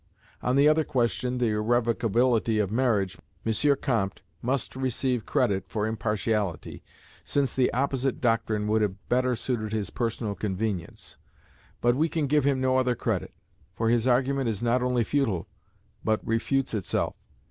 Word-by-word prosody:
On 125 - +1
the 140 +2 +5
other 155 +1 +4
question, 125 -1 0
the 120 -2 +1
irrevocability 115 +1 +2
of 105 -2 0
marriage, 110 -6 +1 0.3
M. 140 +6 +3
Comte 110 -8 -1 0.2
must 130 +2 -1
receive 130 -2 -1
credit 95 -1 +1
for 105 -2 -1
impartiality, 105 -4 -2 0.4
since 140 -2 0
the 130 -1 +2
opposite 135 +1 0
doctrine 115 -3 +1
would 110 +1 +2
have 100 -3 0
better 125 0 +2
suited 110 -3 -2
his 105 -2 -2
personal 115 -3 -2
convenience: 100 -3 -4 0.6
but 120 0 +3
we 160 +4 +2
can 160 -2 0
give 145 0 +2
him 140 -2 +2
no 130 0 +2
other 125 -1 +1
credit, - - -2 0.4
for 115 0 0
his 120 +1 +2
argument 130 0 +2
is 110 0 -3
not 120 +1 +2
only 125 -1 +1
futile 115 - 0 0.6
but 110 -1 +1
refutes 130 +4 0
itself. 105 -4 -1
120 Hz, 150 wpm, -27 LUFS, 110-130 Hz, 0.6 s, the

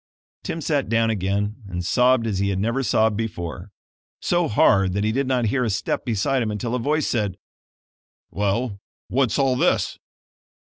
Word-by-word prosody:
Tim 165 - -4
sat 145 -2 0
down 115 0 +2
again 100 +1 -1
and 90 -1 -4
sobbed 125 +3 +3
as 105 -4 -1
he 100 0 +1
had 95 - -1
never 115 +7 0
sobbed 110 -4 +2
before; 95 -4 -5 0.5
so 175 -1 +1
hard 95 -3 +3
that 100 +1 0
he 110 - +1
did 135 +3 0
not 125 -3 +1
hear 130 -2 +1
a 115 - 0
step 100 - -2
beside 125 +4 0
him 110 - -1
until 110 +3 -3
a 125 - 0
voice 150 +5 0
said: 105 -6 -1 0.9
"Well, 100 +2 -1 0.3
what's 130 -3 +1
all 135 -2 +2
this?" 165 +8 +1
115 Hz, 175 wpm, -23 LUFS, 100-130 Hz, 0.9 s, sobbed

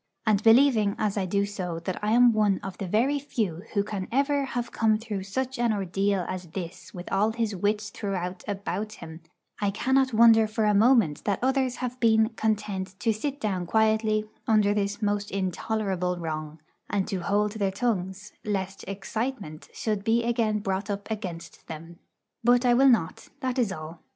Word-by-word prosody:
And 210 -2 +3
believing, 225 -3 +5
as 210 -2 0
I 195 -3 -1
do, 200 +2 +1
that 180 -3 -4
I 210 +1 0
am 240 0 +6
one 210 -3 +2
of 195 -1 -5
the 195 - -3
very 250 +10 +2
few 215 - -2
who 200 - +3
can 200 -2 -4
ever 280 +2 +1
have 245 -3 -4
come 220 -1 +2
through 215 -3 -5
such 255 +6 -3
an 240 -1 +2
ordeal 195 -1 0
as 185 -1 -5
this 180 +1 -7
with 175 -1 -9
all 210 +3 +2
his 225 -3 -1
wits 210 +3 -1
throughout 185 -4 -4
about 205 +1 -3
him, 160 -4 -10 0.4
I 205 - +2
cannot 260 +6 +2
wonder 225 -1 +6
for 215 0 -1
a 210 - +3
moment 215 - +4
that 200 -2 +1
others 260 -1 +1
have 250 +1 -6
been 220 -2 +4
content 205 -4 -2
to 225 - +2
sit 280 +6 -4
down 190 -6 -2
quietly 220 0 +2 0.2
under 210 -2 +4
this 205 +1 -2
most 205 0 0
intolerable 190 -1 -1
wrong, 155 -2 -5 0.3
and 195 -2 0
to 195 - -2
hold 205 +4 +1
their 205 -2 -1
tongues, 195 -2 -2
lest 195 -2 -3
'excitement' 200 -3 -4
should 210 -3 -2
be 230 +2 +2
again 230 -3 0
brought 195 +1 -2
up 200 +2 -4
against 180 -6 -6
them. 165 +2 -9 0.4
But 245 +1 +4
I 245 - +5
will 270 +3 +6
not, 180 -9 +1
that 260 -1 -1
is 225 -5 +1
all. 160 -1 -8
210 Hz, 180 wpm, -26 LUFS, 190-225 Hz, 0.4 s, am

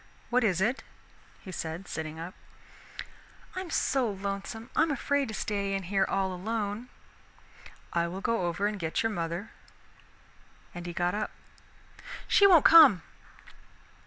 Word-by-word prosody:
"What 250 +1 +3
is 190 -4 +1
it?" 240 +7 +1 0.6
he 190 - -9
said, 165 +1 -5
sitting 160 0 -5
up. 170 +3 -7 1.2
"I'm 370 -1 -5
so 265 -6 +1
lonesome, 200 +3 -5
I'm 320 +1 +3
afraid 285 0 0
to 220 - -5
stay 200 -1 -2
in 195 - -3
here 195 +2 +1
all 190 -1 0
alone." 210 +4 -3 1.0
"I 170 0 +1
will 180 +3 -6
go 195 -3 0
over 175 +4 -1
and 210 -1 -1
get 165 +3 -1
your 225 - 0
mother." 170 +2 -4 1.2
And 175 0 -7
he - - -4
got 175 +1 0
up. 215 +1 -2 1.0
"She 400 - +6
won't 345 -6 +6
come." 310 - +8
200 Hz, 140 wpm, -29 LUFS, 175-230 Hz, 1.2 s, come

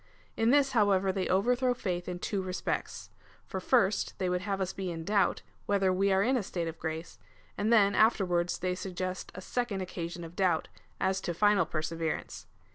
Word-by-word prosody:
In 225 +1 +2
this, 275 +1 +4
however, 200 -5 +3
they 190 -1 -2
overthrow 245 +6 +2
faith 180 -6 -3
in 180 - -3
two 195 +2 -2
respects: 185 0 -4 0.3
for 190 - -4
first 205 -1 +2
they 185 -1 -1
would 180 0 0
have 195 0 -2
us 190 -1 -2
be 190 -2 -4
in 165 -1 -5
doubt, 200 +2 +1 0.2
whether 195 -2 +2
we 195 +2 +2
are 190 +1 +4
in 255 +5 +2
a 250 - +1
state 175 -3 -3
of 165 0 -6
grace, 160 +1 -5 0.4
and 215 +3 0
then 200 -3 +5
afterwards 180 -5 +2
they 185 0 -1
suggest 185 0 -4
a 185 - -6
second 225 -2 -2
occasion 175 -2 -5
of 165 +1 -9
doubt 180 -4 +1 0.2
— - - -35
as 190 0 -1
to 175 - -3
final 205 -2 +3
perseverance. 165 0 -3
190 Hz, 195 wpm, -30 LUFS, 175-205 Hz, 0.4 s, then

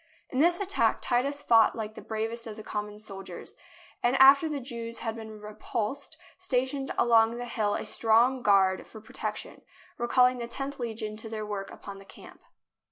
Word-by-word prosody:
In 260 - -1
this 345 +3 +4
attack 400 0 +1
Titus 280 +4 0
fought 225 -2 +5
like 215 -2 -5
the - - -10
bravest 225 +1 -4
of 215 - -7
the 215 - -9
common 210 0 -5
soldiers, 195 -2 -9 0.5
and 245 +2 +2
after 275 +4 +7
the 295 -2 -2
Jews 235 -3 -6
had 225 -1 -3
been 220 -1 -9
re 210 0 -9
pulsed 215 +4 -4 0.2
stationed 270 -5 -1
along 230 0 +4
the 245 - -4
hill 215 -3 -1
a - - -3
strong 230 +4 +3
guard 195 -3 +3
for 220 - -11
protection, 220 - -6 0.4
recalling 250 +1 +3
the 235 - -4
Tenth 275 +3 -5
Legion 220 -3 -4
to 225 0 -7
their 215 -1 -4
work 205 -2 -4
upon 200 -1 -10
the 195 - -14
camp. - - -14
230 Hz, 180 wpm, -28 LUFS, 215-255 Hz, 0.5 s, after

